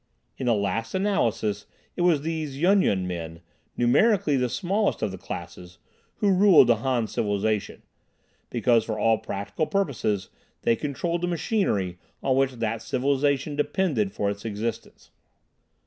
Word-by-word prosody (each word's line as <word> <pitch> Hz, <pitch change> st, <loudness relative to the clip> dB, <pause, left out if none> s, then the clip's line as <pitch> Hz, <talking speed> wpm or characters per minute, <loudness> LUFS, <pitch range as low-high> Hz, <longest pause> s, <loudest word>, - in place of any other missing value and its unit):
In 130 Hz, -, -4 dB
the 120 Hz, -, +4 dB
last 115 Hz, -, -2 dB
analysis 115 Hz, -, 0 dB, 0.3 s
it -, -, -3 dB
was 170 Hz, -5 st, +3 dB
these 155 Hz, -4 st, -3 dB
Yun 190 Hz, +4 st, +4 dB
Yun 95 Hz, -, +1 dB
men, 85 Hz, -2 st, -5 dB, 0.4 s
numerically 150 Hz, -, +3 dB
the 125 Hz, -2 st, +1 dB
smallest 195 Hz, -, 0 dB
of -, -, 0 dB
the 95 Hz, -, -7 dB
classes, 90 Hz, 0 st, -8 dB, 0.4 s
who 205 Hz, -, +2 dB
ruled 185 Hz, -6 st, +7 dB
the 120 Hz, -, +5 dB
Han 120 Hz, 0 st, 0 dB
civilization, 105 Hz, 0 st, -2 dB, 0.7 s
because 120 Hz, -1 st, +2 dB
for 110 Hz, -1 st, -4 dB
all 115 Hz, 0 st, +2 dB
practical 100 Hz, +11 st, -3 dB
purposes 120 Hz, -, -1 dB, 0.3 s
they 115 Hz, -, +3 dB
controlled 165 Hz, +6 st, -2 dB
the 175 Hz, -, 0 dB
machinery 165 Hz, -, -1 dB, 0.2 s
on 130 Hz, -1 st, +2 dB
which 135 Hz, 0 st, +2 dB
that 115 Hz, -2 st, -3 dB
civilization 140 Hz, +3 st, 0 dB
depended 150 Hz, -, 0 dB
for 100 Hz, -, -2 dB
its 100 Hz, 0 st, -8 dB
existence. 110 Hz, +1 st, -5 dB
125 Hz, 145 wpm, -25 LUFS, 105-165 Hz, 0.7 s, ruled